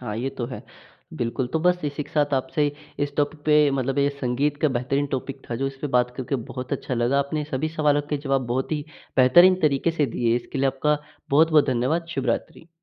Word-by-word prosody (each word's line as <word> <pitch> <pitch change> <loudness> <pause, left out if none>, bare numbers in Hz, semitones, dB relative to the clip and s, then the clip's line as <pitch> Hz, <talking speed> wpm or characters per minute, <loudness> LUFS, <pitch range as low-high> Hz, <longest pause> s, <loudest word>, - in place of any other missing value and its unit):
हाँ, 110 -4 -5
ये 130 +4 -2
तो 125 -3 -4
है, 125 - -7 0.5
बिल्कुल। 120 +2 -2
तो 160 - +2
बस 180 +1 +2
इसी 145 0 -2
के - - -15
साथ 145 -2 +2
आपसे 135 +3 0 0.4
इस 140 0 -7
टॉपिक 145 +1 0
पे 150 -1 +5
मतलब 135 0 -1
ये 140 - +3
संगीत 140 +4 0
का 155 - +5
बेहतरीन 135 +2 -1
टॉपिक 135 +1 -5
था - - -1
जो 135 +3 -1
इस 135 0 -5
पे 150 - -2
बात 125 0 +2
करके 135 +1 -2
बहुत 125 +1 -6
अच्छा 135 -1 -2
लगा। 120 +3 +1
आपने 145 +2 -1
सभी 135 +4 -1
सवालों 150 -2 +2
के 150 - +1
जवाब 135 -2 0
बहुत 130 +5 -2
ही 150 -1 -2 0.3
बेहतरीन 175 +9 +7
तरीक़े 145 +2 +2
से 155 -3 0
दिए, 120 -1 0
इसके 125 +3 -5
लिए 135 - +2
आपका 145 +3 +1 0.3
बहुत-बहुत 155 +1 +5
धन्यवाद। 130 +6 0
शुभ 135 -1 -2
रात्रि। 120 +7 -3
140 Hz, 220 wpm, -24 LUFS, 130-150 Hz, 0.5 s, बेहतरीन